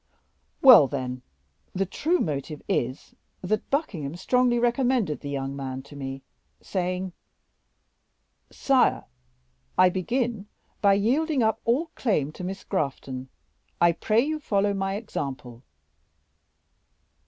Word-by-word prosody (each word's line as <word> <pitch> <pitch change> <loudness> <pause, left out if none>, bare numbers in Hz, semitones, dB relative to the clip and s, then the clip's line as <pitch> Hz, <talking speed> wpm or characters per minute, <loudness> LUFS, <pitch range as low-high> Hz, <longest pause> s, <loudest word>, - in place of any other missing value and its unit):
"Well, 240 - +10
then, 130 -2 -4 0.5
the 195 +1 +1
true 320 - 0
motive 150 - -3
is 130 +3 -2 0.3
that 215 +4 -1
Buckingham 170 - -2
strongly 245 +6 +2
recommended 240 - +1
the 145 - -7
young 135 -1 -3
man 135 -1 -5
to 140 +1 -14
me, 135 -1 -6 0.4
saying: 185 -1 -3 1.4
'Sire, 270 -2 +2 0.7
I 185 - +7
begin 225 +3 -2 0.3
by 200 -1 +5
yielding 265 +7 +1
up 220 0 +1
all 290 +8 +1
claim 155 - 0
to 180 - -9
Miss 190 +2 -5
Grafton; 135 -6 -3 0.5
I 170 0 +5
pray 215 +6 +1
you 310 +3 -2
follow 205 -7 +1
my 195 0 -2
example. 135 - -5
190 Hz, 115 wpm, -26 LUFS, -, 1.4 s, Well